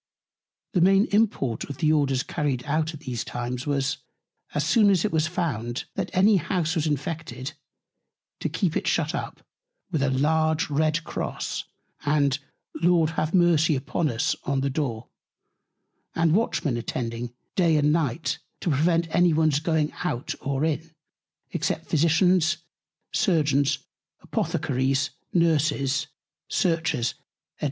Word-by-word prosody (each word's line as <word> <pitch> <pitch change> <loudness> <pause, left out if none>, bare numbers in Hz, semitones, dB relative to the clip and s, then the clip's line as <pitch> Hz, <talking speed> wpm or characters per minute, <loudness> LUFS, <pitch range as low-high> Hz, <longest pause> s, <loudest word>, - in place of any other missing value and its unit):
The 180 - +2
main 195 +3 +5
Import 200 - +1
of 140 - -7
the 155 -1 +3
Orders 135 -4 +2
issued 140 -4 -1
out 155 +2 0
at 150 - -12
these 125 -6 -3
Times 125 +2 -4
was, 140 -2 0 0.6
As 150 0 +1
soon 205 +6 +5
as 190 -2 +3
it 215 - 0
was 155 -1 +2
found, 130 -10 -2
that - - -3
any 200 +3 +5
House 170 -2 0
was 160 -3 0
infected, 145 -3 -3 0.9
to - - -2
keep - - -1
it - - -1
shut - - +1
up, - - -5 0.5
with 155 - 0
a 140 - +2
large 155 +4 +1
red 155 +2 +1
Cross, - - -4 0.4
and 145 -2 +2 0.4
Lord 170 -2 +4
have 160 +1 -1
Mercy 165 -3 +4
upon 145 +4 -1
us 115 -2 0
on 135 0 0
the 140 0 0
Door; 125 -6 -2 1.1
and 165 -1 +3
Watchmen 170 - +1
attending 120 0 -4 0.2
Day 170 -4 +3
and 150 0 +3
Night 160 -1 -1 0.2
to 170 - 0
prevent 165 +4 +2
any 175 -1 +5
one's 155 -2 +3
going 160 -1 +1
in 130 -10 -4
or 140 +2 0
out, 160 0 -1 0.7
except - - -2
Physicians, 170 +2 +3 0.6
Surgeons, 145 - +2 0.5
Apothecaries, 135 +3 0 0.2
Nurses, 145 -5 +2 0.4
Searchers, 160 - 0
&c. - - -31
155 Hz, 135 wpm, -25 LUFS, 135-165 Hz, 1.1 s, main